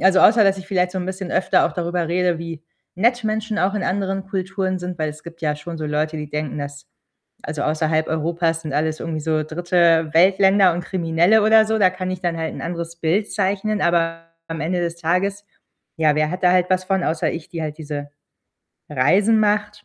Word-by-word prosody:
Also, 190 0 +4
außer 220 0 +6
dass 195 0 +2
ich 190 - -9
vielleicht 180 -2 0
so 190 - -3
'n 180 - -4
bisschen 190 -1 -5
öfter - - +3
auch - - -5
darüber 175 -1 -2
rede, 175 -1 +1
wie 165 -2 -7 0.3
nett 240 +5 +2
Menschen 215 0 -2
auch 190 +3 +1
in 210 - -2
anderen 195 0 -2
Kulturen 190 0 -2
sind, 180 -1 -6
weil 155 -1 -1
es 155 +1 -9
gibt 170 0 -11
ja 150 -1 0
schon 165 +3 -7
so 155 - -4
Leute, 155 +1 -1
die 150 -1 -6
denken, 150 -1 -3
dass 140 0 -7 0.6
also, 150 -1 -4
außerhalb 155 +1 0
Europas 165 +1 -1
sind 155 -3 -5
alles 155 +2 -1
irgendwie 160 -2 -4
so 155 0 0
Dritte-Welt-Länder 175 +3 +3
und 175 - -3
Kriminelle 175 +4 +2
oder 220 0 +5
so. 220 0 0
Da 185 -3 +5
kann 185 0 -5
ich 185 -1 -4
dann 175 -2 -1
halt 160 0 -3
'n - - -7
anderes 170 0 -5
Bild 170 +6 0
zeichnen, 205 +1 -1
aber 165 -1 +1 0.3
am 165 0 -5
Ende 175 +3 -1
des 170 -1 -2
Tages, 185 +5 -1 0.5
ja, 155 -2 +3
wer 155 0 +1
hat 180 +2 -5
da 180 - +5
halt 180 0 +2
was 185 0 +1
von, 190 -1 0
außer 160 0 0
ich, 165 -1 -7
die 170 - -6
halt 155 -1 -4
diese 145 -2 -6 0.8
Reisen 195 - +3
macht? 210 0 0
175 Hz, 210 wpm, -21 LUFS, 160-190 Hz, 0.8 s, außer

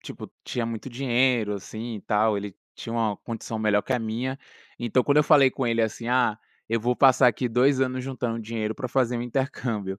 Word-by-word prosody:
tipo, - - -9
tinha 120 - -2
muito 115 +2 -5
dinheiro, 125 -3 +1
assim 110 +3 -6
e - - -8
tal, 105 0 +1
ele 100 -1 -5 0.2
tinha 115 - -7
uma 110 -3 0
condição 115 0 -6
melhor 105 -1 +2
que - - -3
a 125 - +1
minha, 120 +4 -3 0.4
então, 120 +1 +1
quando 140 +2 +1
eu 150 - +5
falei 140 -4 +6
com 130 0 -3
ele, 115 -1 +1
assim: 110 +1 -3
"Ah, 120 -3 +2 0.3
eu 115 +1 +1
vou 120 +3 +1
passar 130 0 +5
aqui 125 +1 +1
2 130 +3 +3
anos 130 -1 -1
juntando 120 -3 -3
dinheiro 110 -1 -3
para 130 - -5
fazer 125 -1 0
um - - -3
intercâmbio". 115 -6 -3
120 Hz, 210 wpm, -25 LUFS, 110-130 Hz, 0.4 s, falei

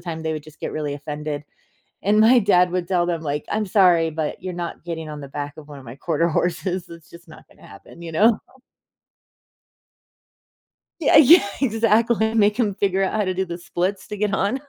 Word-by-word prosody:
time, 160 -2 -5
they 160 - -2
would 155 -1 -6
just 155 -1 -16
get - - -4
really 150 -2 -3
offended. 145 0 -5 0.6
And 210 +2 +3
my 235 +4 +6
dad 180 -3 +3
would 180 -2 -2
tell 175 -2 +1
them, 170 -2 -2
like, 150 -1 -3
"I'm 215 +1 0
sorry, 180 -5 +3
but 155 -1 -4
you're 185 - -5
not 175 -1 -6
getting 160 -2 -5
on 150 -1 -7
the 140 - -9
back 145 +1 -6
of 155 - -12
one 145 -2 -11
of 135 - -13
my 120 +3 -9
Quarter 165 +2 0
Horses, 175 +2 -2
it's 165 -1 -13
just 170 0 -15
not 155 - -16
gonna - - -19
happen," 100 +12 -14
you 165 -1 -7
know? 215 +7 +4 2.6
Yeah 290 - +4
yeah, 310 - +7
exactly, 225 -1 +2
make 210 -1 +3
them 210 -5 +1
figure 195 -1 0
out 190 - -1
how 215 -1 +1
to 185 - -1
do 190 +1 -2
the 170 - -5
splits 180 +2 -3
to 210 - -6
get 205 -1 0
on. 220 +8 -1
175 Hz, 210 wpm, -22 LUFS, 155-205 Hz, 2.6 s, yeah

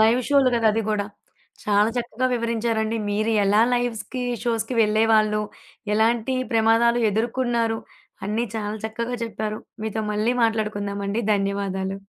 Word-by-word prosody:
Live 225 +3 +5
షో‌లు 280 -2 +5
గదా! 230 -1 +2
అది 225 - 0
గూడా. 210 -2 0 0.6
చాలా 210 +1 +3
చక్కగా 240 +1 -2
వివరించారండి. 230 -1 -1
మీరు 215 +2 0
ఎలా 205 +2 +4
లైవ్‌స్‌కి, 245 +1 -2 0.2
షోస్‌కి 230 +1 -1
వెళ్ళేవాళ్ళు, 215 0 +3 0.5
ఎలాంటి 230 +3 +2 0.2
ప్రమాదాలు 230 +1 +3
ఎదుర్కున్నారు? 230 0 0 0.5
అన్ని 215 +4 -1
చాలా 210 -1 -3
చక్కగా 235 +2 -3
చెప్పారు. 215 -1 -4 0.2
మీతో 220 0 -2
మళ్ళీ 215 +4 +1
మాట్లాడుకుందాం 210 -3 -1
అండి. 210 +4 -1
ధన్యవాదాలు. 195 -1 -2
220 Hz, 125 wpm, -23 LUFS, 210-235 Hz, 0.6 s, Live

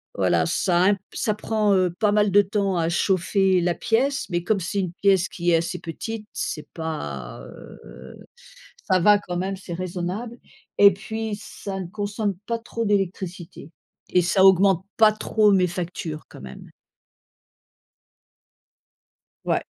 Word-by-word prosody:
voilà, - - +2
ça 180 -1 +2
un 200 0 +4 0.2
ça 215 -2 -1
prend, 215 -1 0
heu, 180 -2 +1
pas 210 -2 +3
mal 205 -1 +2
de 205 +1 +6
temps 200 -2 -1
à 165 0 +1
chauffer 190 +1 +2
la 175 -1 0
pièce, 270 +8 0
mais 175 -1 -1
comme 205 +1 +1
c'est 185 +3 -3
une 180 -3 -2
pièce 195 -2 +3
qui 175 0 -1
est - - +5
assez 170 +2 -3
petite, 210 +6 -6
c'est 155 - -4
pas, 75 - -5
heu, 65 +2 -13 0.6
ça 185 -1 +4
va 205 +3 +5
quand 175 -3 -5
même, 190 +2 -2
c'est 180 -2 -8
raisonnable, 185 +6 -4 0.4
et 200 0 +9
puis 220 +1 -5
ça 195 -1 -7
ne 185 - -4
consomme 205 0 -3
pas 230 0 -1
trop 230 0 -4
d'électricité 185 -5 -3 0.4
et 180 - +4
ça 190 +2 +3
augmente 190 -1 +5
pas 220 -1 +6
trop 215 -1 +2
mes 185 -2 +3
factures 170 -3 -5
quand - - -12
même. 65 0 -11 2.8
Ouais - - +1
190 Hz, 150 wpm, -23 LUFS, 175-210 Hz, 2.8 s, et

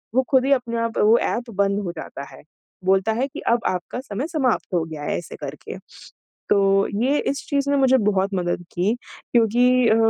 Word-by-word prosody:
वो 260 - +4
खुद 260 -1 +4
ही 280 - +1
अपने 240 -3 -1
आप 230 -1 -2
वो 220 +3 +5
ऐप 240 0 -2
बंद 200 +1 +1
हो 175 - -2
जाता 140 - -7
है। - - -14 0.4
बोलता 195 +3 +2
है 270 - +1
कि, - - -9
"अब 235 0 +2
आपका 185 +6 -3
समय 260 +4 -4
समाप्त 265 - -1
हो 165 - +2
गया 155 -2 -8
है।" - - -1
ऐसे 175 - -8
करके। - - -7 0.7
तो 195 0 +3 0.2
ये 280 +3 +2
इस 280 - -6
चीज़ 280 -1 0
ने 285 - +3
मुझे 265 -1 +4
बहुत 195 +1 0
मदद 175 -1 -2
की 185 +5 +1 0.4
क्योंकि 245 +2 +4
अ, 220 - +4
230 Hz, 200 wpm, -22 LUFS, 195-260 Hz, 0.7 s, वो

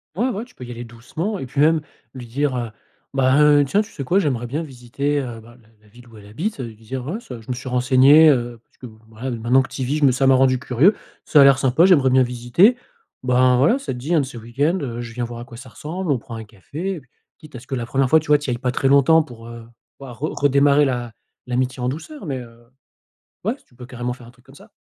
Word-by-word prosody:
Ouais, 235 +8 0
ouais, 220 -1 -4
tu 250 - -23
peux - - -10
y 120 - -9
aller 120 0 -7
doucement 140 - -5
et 135 - -6
puis 140 +3 -2
même 160 +1 +4 0.3
lui 125 -2 -8
dire, 135 +3 -1
heu: 120 -2 -4 0.4
«Bah, 135 +1 +3
heu, 145 -1 +5
tiens, 195 +10 +1
tu 215 - -9
sais 140 - -6
quoi? 180 +9 +2
J'aimerais 130 -9 -1
bien 145 +7 -3
visiter, 140 +1 -3
heu», 120 -3 -7
bah, 120 +2 -16
la 110 - -26
la 105 - -24
ville 120 +3 -18
où 115 -2 -16
elle 105 - -14
habite, 160 - -4
ça, 130 - -6
heu, - - -5
lui 110 - -12
dire: 120 +4 -7
«Ouais 190 +9 -3
ça, 125 - -10
je 110 - -17
me - - 0
suis 130 +1 -7
renseigné, 130 +5 +6
heu, 120 -4 0
parce - - -37
que - - -11 0.2
voilà, 115 +4 -6
heu, 120 - -4
maintenant 120 +4 +3
que 135 - -6
tu - - -7
y - - -1
vis, 140 +4 -1
je 150 - +2
me 135 - +5
ça 130 +2 0
m'a 135 - +6
rendu 130 -1 +3
curieux, 140 - +3 0.3
ça 150 - +5
a - - +9
l'air 135 -1 +6
sympa, 135 +7 +3
j'aimerais 150 -9 +5
bien 130 0 +4
visiter. 125 - +3 0.5
Ben 125 0 +3
voilà, 145 - +3
ça 275 - -5
te - - -7
dit 140 +8 -3
un 160 - +4
de - - -3
ce 125 -2 -10
week-end, 135 +10 -1
heu, 120 -4 -5
je 115 -1 -8
viens 120 - -3
voir 120 0 -8
à 120 - -8
quoi 120 -2 -12
ça 130 +1 -12
ressemble, 165 +7 -5
on 135 - +2
prend 115 0 -10
un 110 - -7
café?» 145 - -6
et - - -8
puis 130 - -28 0.3
quitte 155 -4 -15
à - - -6
ce 125 - -17
que 135 - -3
la 120 -2 -3
première 135 +2 0
fois, 160 - +6
tu 155 - -12
vois, 150 0 +5
tu 145 - -7
y - - -2
ailles 120 - -2
pas 125 +1 -2
très 135 - 0
longtemps 140 +4 +5
pour 115 -6 -13
heu, 115 -1 -10 0.3
pouvoir 125 -4 -11
re 155 +3 -3
redémarrer 140 +1 +4
l'a 120 -3 -3 0.3
l'amitié 125 +1 -2
en 125 - -1
douceur, 195 - -8
mais, 135 -4 -3
heu, 120 -1 -14 0.8
ouais 220 +5 0
s 285 - -22
tu - - -28
peux 125 0 -11
carrément 125 0 -4
faire 125 -1 -12
un - - -13
truc 125 0 -26
comme 135 - -17
ça. - - -17
130 Hz, 295 wpm, -21 LUFS, 120-145 Hz, 0.8 s, a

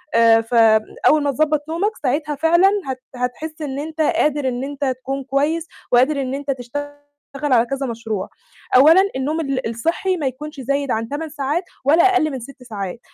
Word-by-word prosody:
آآ 230 -1 +6
فبن 225 -2 +3
أول 300 -1 +4
ما 285 - +1
تضبّط 300 +1 0
نومك 400 +7 -1
ساعتها 295 +3 0
فعلًا 340 +6 +4 0.2
هت 260 -1 -4
هتحس 305 +6 -4
إن 275 -2 -4
أنت 315 +2 -4
قادر 295 -2 +1
إن 250 0 -2
أنت 285 +1 -4
تكون 265 +1 -3
كويس، 295 +5 0 0.2
وقادر 265 +4 +3
إن 260 -1 -3
أنت 280 0 -3
تشتغل 275 +3 -5 0.6
على 235 -1 +5
كذا 275 +1 -3
مشروع، 225 -4 -4 0.5
أولًا 315 +8 +7
النوم 285 +5 -1
ال 270 -5 -2
الصحّي 330 - -1
ما 295 -5 -1
يكونش 295 +3 -6
زايد 280 +1 -1
عن 225 +1 -2
8 310 +3 -4
ساعات 295 +4 -2 0.2
ولا 315 +5 +5
أقل 370 -5 +3
من 265 - -4
6 255 +1 -12
ساعات، 205 -4 -6
275 Hz, 180 wpm, -20 LUFS, 250-305 Hz, 0.6 s, أولًا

